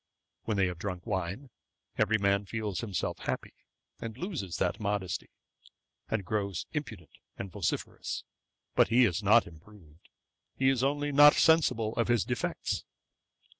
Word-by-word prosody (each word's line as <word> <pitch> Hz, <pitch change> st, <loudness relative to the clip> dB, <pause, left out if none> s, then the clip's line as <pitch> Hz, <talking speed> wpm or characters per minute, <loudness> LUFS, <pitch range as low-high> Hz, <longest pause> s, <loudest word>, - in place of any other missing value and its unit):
When 110 Hz, -2 st, -1 dB
they 95 Hz, -, +4 dB
have 90 Hz, -2 st, -4 dB
drunk 90 Hz, -2 st, -5 dB
wine, 100 Hz, +5 st, -3 dB, 0.4 s
every 110 Hz, +2 st, +2 dB
man 100 Hz, 0 st, +1 dB
feels 105 Hz, -4 st, -3 dB
himself 100 Hz, -7 st, -3 dB
happy, -, -, -4 dB, 0.5 s
and 115 Hz, 0 st, -6 dB
loses 145 Hz, -, -4 dB
that -, -, 0 dB
modesty, 100 Hz, -3 st, -2 dB, 0.8 s
and 110 Hz, -4 st, -1 dB
grows 100 Hz, -2 st, -2 dB
impudent 110 Hz, -, -5 dB, 0.3 s
and 95 Hz, -1 st, -6 dB
vociferous: 90 Hz, -4 st, -3 dB, 0.5 s
but -, -, +5 dB
he 120 Hz, +2 st, +5 dB
is 90 Hz, -7 st, 0 dB
not -, -, +5 dB
improved; 85 Hz, -1 st, -17 dB, 0.5 s
he 130 Hz, 0 st, +3 dB
is 130 Hz, -2 st, +1 dB
only 145 Hz, +1 st, 0 dB
not 145 Hz, +1 st, +8 dB
sensible 130 Hz, -9 st, +3 dB
of 115 Hz, -, +2 dB
his 120 Hz, -5 st, +3 dB
defects.' -, -, -2 dB
105 Hz, 140 wpm, -30 LUFS, 95-120 Hz, 0.8 s, not